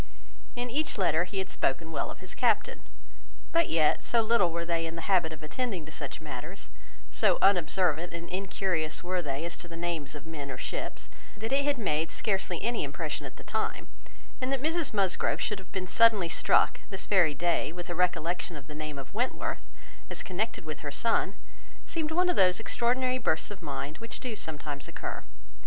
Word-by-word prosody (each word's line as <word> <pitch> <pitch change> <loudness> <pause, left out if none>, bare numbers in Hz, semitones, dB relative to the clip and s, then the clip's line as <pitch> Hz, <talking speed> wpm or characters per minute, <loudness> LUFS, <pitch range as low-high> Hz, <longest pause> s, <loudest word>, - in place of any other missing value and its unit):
In 245 0 -2
each 290 +1 +1
letter 175 -3 +3
he 195 - -6
had 190 0 -1
spoken 160 +5 0
well 155 - -1
of - - -8
his 185 - -7
captain; 235 -4 +2 0.7
but 335 0 +3
yet, 155 -2 +4
so 235 -1 +3
little 215 -6 +4
were 170 +1 -2
they 165 -1 0
in 165 - -5
the 165 - -5
habit 180 -5 +3
of 155 -1 -9
attending 190 -1 -2
to 160 - -10
such - - -5
matters, 65 - -7 0.4
so - - +4
unobservant 175 -3 +3
and 170 0 -5
incurious 185 -4 0
were 180 0 0
they 145 0 -2
as 170 - -3
to 175 - -7
the 165 -1 -8
names 165 -4 -2
of 150 +1 -8
men 150 -4 -6
or 130 - -4
ships, - - -3 0.3
that 225 +3 -3
it 280 +1 +3
had 290 -1 +2
made 160 -7 +1
scarcely 190 -4 -1
any 235 0 +1
impression 150 0 -3
at 125 - -11
the - - -11
time; 220 0 -2 0.5
and 255 +1 0
that 275 - +2
Mrs 325 0 +1
Musgrove 195 -4 +1
should 210 -2 -1
have 190 - -14
been 185 -1 -2
suddenly 210 -3 +5
struck, - - +4
this 195 -2 -3
very 175 -7 +4
day, 170 -2 +1
with 175 +1 -6
a 175 - -2
recollection 175 0 0
of 145 -2 -8
the 150 - -9
name 155 -1 -5
of 135 +5 -8
Wentworth, 245 +5 -1 0.4
as - - -2
connected 195 -1 -2
with 155 -1 -5
her 145 - -4
son, 230 +10 +1 0.5
seemed 320 -2 -1
one 355 +3 +3
of 360 - +3
those 185 0 +5
extraordinary 255 +3 +1
bursts 160 -5 +1
of 205 - -8
mind 140 +2 -4
which 230 0 -6
do 245 -4 -4
sometimes 150 -5 -4
occur. - - -5
180 Hz, 200 wpm, -30 LUFS, 160-225 Hz, 0.7 s, suddenly